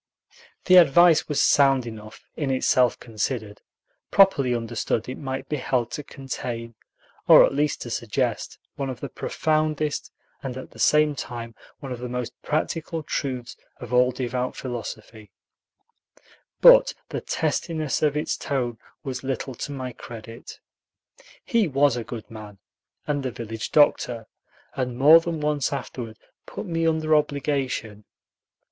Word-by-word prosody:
The 185 -1 +7
advice 170 0 +6
was 150 - 0
sound 135 -3 +4
enough, 110 -2 -10
in 145 -3 -2
itself 130 -1 +2
considered; 110 -1 -4 0.5
properly 140 -11 +4
understood, 115 -1 -2
it 130 - -6
might 130 -1 -5
be 150 - -2
held 125 -3 -1
to - - -4
contain, 125 -4 -6 0.5
or - - +9
at - - -2
least 150 +2 0
to 120 - -7
suggest, 115 +1 -2 0.2
one 135 -1 -3
of 130 - -6
the - - -6
profoundest, 155 -1 -1 0.3
and 130 -2 -5
at 130 - -9
the - - -15
same 150 0 +4
time 115 -3 -6 0.3
one 135 -3 -7
of 125 - -5
the 125 0 -5
most 125 -1 -4
practical, 160 +1 -2
truths 130 -4 -4 0.2
of 125 0 -8
all 125 +1 +4
devout 125 0 -3
philosophy; 110 -3 -7 1.3
but - - +8
the - - -4
testiness 155 -4 -1
of 150 -1 +2
its 150 - -1
tone 120 -5 -2 0.2
was 130 -3 -5
little 135 0 -3
to 145 - -6
my 130 -3 -5
credit. 115 0 -10 0.9
He 230 -6 +2
was 140 -2 +3
a 120 - -3
good 115 -1 -8
man, 105 -2 -10 0.5
and 145 -1 -1
the 130 - -2
village 115 -2 -6
doctor, 125 -6 +3 0.5
and 125 -2 -3
more 150 +5 +8
than 165 -2 -4
once 150 -2 0
afterward 125 -5 -6 0.3
put 205 - -6
me 165 -2 0
under 155 -1 +2
obligation. 140 -8 -1
130 Hz, 145 wpm, -24 LUFS, 120-150 Hz, 1.3 s, or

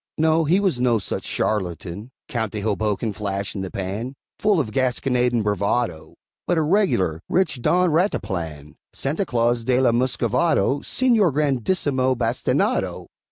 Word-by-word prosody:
No, 160 +1 +3
he 175 +6 +3
was 190 -10 0
no 125 -2 +3
such 100 - -4
charlatan 95 +1 -3 0.2
Count 115 -6 -3
de 105 - -3
Hoboken 105 +1 -1
Flash 100 -1 -3
in 100 - -4
the 95 - -4
pan, 100 +8 -4 0.2
Full 210 -4 +3
of 110 -8 -2
gasconade 125 0 +1
and 115 -3 0
bravado 105 -3 -1 0.3
But 175 - +1
a 160 - +3
regular, 150 - +1
rich 180 -9 +1
Don 180 +8 +3
Rataplan, 90 - -2 0.2
Santa 155 +8 -2
Claus 120 0 +1
de 125 +2 +2
la 130 -2 +4
Muscovado, 125 +4 +1
Señor 225 - +2
Grandissimo 135 -2 +1
Bastinado. 120 0 0
125 Hz, 145 wpm, -22 LUFS, 105-150 Hz, 0.3 s, la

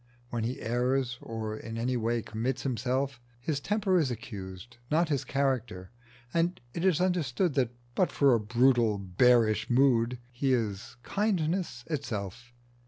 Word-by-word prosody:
When 120 -2 -1
he 120 +3 -2
errs 125 +2 0
or 110 -1 -4
in 115 +1 -7
any 125 +2 0
way 115 -1 0
commits 120 +4 -2
himself, 130 +1 -1 0.2
his 140 +3 -2
temper 195 +1 +1
is 150 -5 +1
accused, 105 -1 -7
not 160 +2 +2
his 140 -4 0
character, 125 -9 -1 0.4
and 170 +2 +1
it 170 - -3
is 185 -4 +3
understood 180 -3 +1
that 130 -4 +2 0.2
but 185 - +2
for 140 -3 +4
a 115 - +4
brutal 120 0 +3
bearish 110 +4 +3
mood 125 -1 +3
he 130 +2 +1
is 105 -5 -2
kindness 180 - -1
itself. 120 - -4
125 Hz, 145 wpm, -29 LUFS, 115-140 Hz, 0.4 s, for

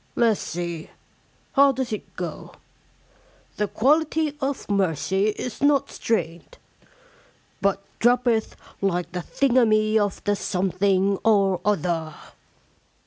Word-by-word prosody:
Let's 230 -3 +3
see, 170 -1 -5 0.6
how 280 -1 +5
does 255 -2 -3
it 215 - -7
go? - - -6 1.0
The 210 - 0
quality 305 +5 +1
of 270 0 -3
mercy 190 0 0
is 215 +2 -4
not 285 -1 +3
strained, 215 - -3 1.0
but 195 0 +1 0.2
droppeth 240 -2 +2 0.3
like 180 -3 -1
the 180 - -3
thingamy 220 -2 +2
of 205 -2 -2
the 205 -1 +1
something 190 +1 +1
or 195 -4 +3
other." 170 -6 -1
205 Hz, 105 wpm, -24 LUFS, 190-245 Hz, 1.0 s, how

